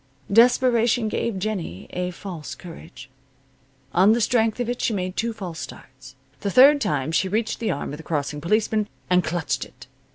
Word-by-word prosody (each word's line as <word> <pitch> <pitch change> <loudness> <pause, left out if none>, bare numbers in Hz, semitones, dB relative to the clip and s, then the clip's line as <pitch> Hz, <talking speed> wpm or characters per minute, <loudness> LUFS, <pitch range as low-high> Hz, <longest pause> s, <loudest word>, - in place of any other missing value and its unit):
Desperation 235 -1 +4
gave 220 -1 -2
Jennie 190 - -4
a 180 0 -2
false 175 -4 -7
courage. 160 -7 -11 0.9
On 195 +5 +5
the 235 - +1
strength 225 -1 +1
of 245 - -1
it 245 0 -3
she 225 - +1
made 185 -2 -3
two 230 +1 -1
false 185 -7 -7
starts. 135 0 -11 0.2
The 200 - -2
third 275 +7 +7
time 150 - -1
she 190 +3 +1
reached 220 +3 -1
the 225 - -1
arm 140 - -3
of - - -6
the - - -9
crossing 150 -2 -3
policeman, 215 +3 +1 0.2
and 180 0 +4
clutched 155 -5 -2
it. - - -14
195 Hz, 175 wpm, -23 LUFS, 160-225 Hz, 0.9 s, third